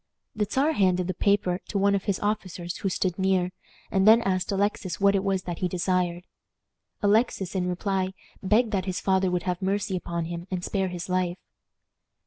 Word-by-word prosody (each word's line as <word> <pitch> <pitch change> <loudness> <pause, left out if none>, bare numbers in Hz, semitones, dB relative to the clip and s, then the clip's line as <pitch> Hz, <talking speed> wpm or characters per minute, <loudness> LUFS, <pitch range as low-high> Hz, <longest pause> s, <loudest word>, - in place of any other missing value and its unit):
The 210 -1 0
Czar 280 +6 +2
handed 185 - +2
the 185 - -2
paper 185 -1 +1
to 205 - -2
one 200 +1 +3
of 200 -1 -1
his 200 -2 0
officers 185 -5 -3
who 195 - -1
stood 185 0 -1
near, 190 -1 +2 0.4
and 190 +1 +3
then 230 +2 +7
asked 185 -1 0
Alexis 200 -2 -1
what 200 0 +4
it 195 -1 +1
was 195 -2 0
that 175 -2 -5
he 180 - +1
desired. 180 -1 0 0.8
Alexis, 205 -3 +2
in 180 -2 0
reply, 190 +1 -1 0.3
begged 215 +4 +2
that 190 -3 0
his 185 0 -2
father 190 -1 +2
would 180 -1 -1
have 180 0 -2
mercy 195 +1 0
upon 170 -2 -3
him 170 +1 -6
and 180 -2 -3
spare 195 -2 0
his 180 -1 -5
life. 180 -1 0
190 Hz, 190 wpm, -26 LUFS, 180-200 Hz, 0.8 s, then